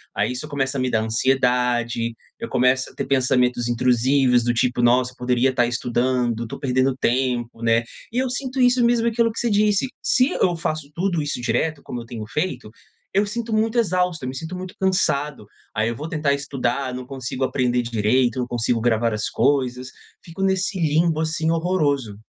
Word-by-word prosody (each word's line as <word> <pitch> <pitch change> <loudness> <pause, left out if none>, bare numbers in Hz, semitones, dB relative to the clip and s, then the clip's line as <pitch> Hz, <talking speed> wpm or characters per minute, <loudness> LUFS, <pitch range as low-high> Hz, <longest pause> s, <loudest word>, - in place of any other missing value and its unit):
Aí, - - 0
isso 130 +5 -6
começa 135 -1 -1
a - - 0
me 130 - 0
dar 110 - +2
ansiedade. 120 -1 +1 0.3
Eu 230 - -5
começo 130 +1 +2
a - - -18
ter - - -3
pensamentos 125 -2 +1
intrusivos, 125 +1 +3
do 120 0 +1
tipo: 120 +1 +1
"Nossa, 125 +1 +3
eu - - -22
poderia 125 +1 +2
estar 125 -2 +2
estudando, 120 -1 0
tô - - -7
perdendo 130 0 +1
tempo", 120 -2 0
né. 115 0 +3 0.3
E 240 - -4
eu 260 -1 0
sinto 260 0 -4
isso 245 -1 +4
mesmo 235 -1 +2
aquilo 230 0 +2
que 225 - -6
você 240 - 0
disse: 210 +3 +2
se 255 +3 +3
eu 175 - +1
faço 155 -3 -3
tudo 175 -2 0
isso 145 -3 -3
direto, 155 +4 -1
como 120 - -6
eu 115 - -10
tenho 115 -2 -7
feito, 135 -4 -3 0.4
eu 200 +2 +3
sinto 225 +2 -4
muito 220 +2 +1
exausto. 180 - 0
Eu 130 - -2
me 130 - -6
sinto 165 +4 -6
muito 185 0 -8
cansado. 150 - 0 0.3
Aí, 110 +1 +1
eu 115 - -3
vou 150 +7 -6
tentar 150 -3 +1
estudar, 135 -2 -2
não 125 0 -6
consigo 130 -1 -4
aprender 125 -2 +1
d 120 - -6
direito. 120 +3 +2
Não 125 - -1
consigo 120 -1 0
gravar 115 -1 +1
as 105 0 -2
coisas. 130 -1 0 0.4
Fico 170 +3 -9
nesse 190 0 0
limbo 160 0 +2
assim, 160 0 -1
horroroso. 145 - 0
130 Hz, 195 wpm, -22 LUFS, 120-170 Hz, 0.4 s, isso